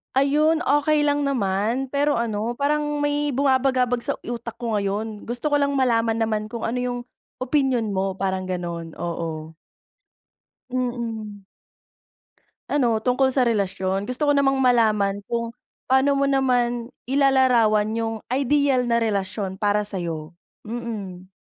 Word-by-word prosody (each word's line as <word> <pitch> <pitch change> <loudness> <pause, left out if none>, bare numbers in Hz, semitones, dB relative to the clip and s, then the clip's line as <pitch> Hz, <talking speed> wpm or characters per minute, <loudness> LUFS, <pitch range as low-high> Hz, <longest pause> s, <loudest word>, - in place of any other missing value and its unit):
Ayun 305 +4 +3
okey 295 -1 +2
lang 290 -1 +1
naman, 235 +1 0
pero 290 +1 +1
ano, 230 0 -1
parang 295 +2 0
may 290 0 0
bumabagabag 260 -2 +2
sa - - 0
utak 235 -1 -5
ko 225 -3 0
ngayon 205 +2 -3
gusto 240 +5 -2
ko 290 - +3
lang 280 0 +1
malaman 230 -4 +2
naman 215 -1 0
kung 230 +1 -7
ano 235 +2 -2
yung 245 0 -2 0.4
opinyon 255 -4 +1
mo 195 0 -1
parang 190 -1 -2
ganun, 170 -3 -4
oo. 160 -2 -5 1.1
Mm. 230 -5 -4 1.3
Ano 235 -6 +2
tungkol 255 +1 +3
sa 260 -1 +2
relasyon, 195 -3 0
gusto 250 +4 -2
ko 290 - +4
namang 280 -1 +3
malaman 215 -5 +3
kung 235 -1 -2 0.4
paano 265 +2 +3
mo 275 - +1
naman 245 -3 +1 0.2
ilalarawan 250 -6 +3
yung 225 0 -2 0.2
ideal 275 -1 +2
na 235 0 +2
relasyon 195 -2 -2
para 210 0 +2
sayo. 170 -6 -5 0.3
Mm. 210 -6 -6
235 Hz, 130 wpm, -23 LUFS, 205-270 Hz, 1.3 s, ko